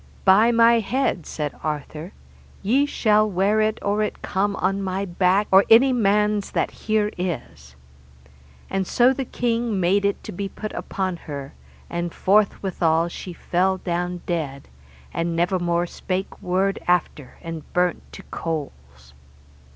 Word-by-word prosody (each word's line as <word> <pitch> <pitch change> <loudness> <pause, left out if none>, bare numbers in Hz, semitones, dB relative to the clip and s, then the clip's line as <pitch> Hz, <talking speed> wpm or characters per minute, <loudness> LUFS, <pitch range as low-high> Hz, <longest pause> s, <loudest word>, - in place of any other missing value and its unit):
By 205 +5 +6
my 230 0 +5
head, 225 - -1
said 150 -2 -4
Arthur, 155 +3 -4 0.5
ye 265 +8 +3
shall 215 -5 +2
wear 200 +3 +2
it 215 0 +1
or 205 +1 +1
it 210 - -3
come 200 +1 0
on 195 +2 0
my 190 +1 -2
back, 185 +3 +2
or 190 +1 +7
any 255 +4 +7
man's 210 -2 +2
that - - 0
here 215 -1 -1
is. 85 - -5 0.9
And 190 -1 -2
so 250 +2 +4
the 270 0 -3
king 230 -4 -1
made 190 +3 +2
it 200 0 -1
to - - -7
be 195 +2 -4
put 215 +2 -7
upon 185 -2 -3
her, 140 -4 -8 0.3
and 170 0 -3
forth 205 +2 +2
withal 170 -3 +1
she 180 - -7
fell 185 +2 0
down 175 0 -3
dead, 145 - -3 0.4
and 170 0 -1
never 180 +2 +1
more 175 0 0
spake 185 +2 -4
word 190 +2 0
after 175 -6 0
and 165 -2 -7
burnt 180 0 +1
to - - -10
coals. 70 - -6
190 Hz, 150 wpm, -23 LUFS, 170-210 Hz, 0.9 s, or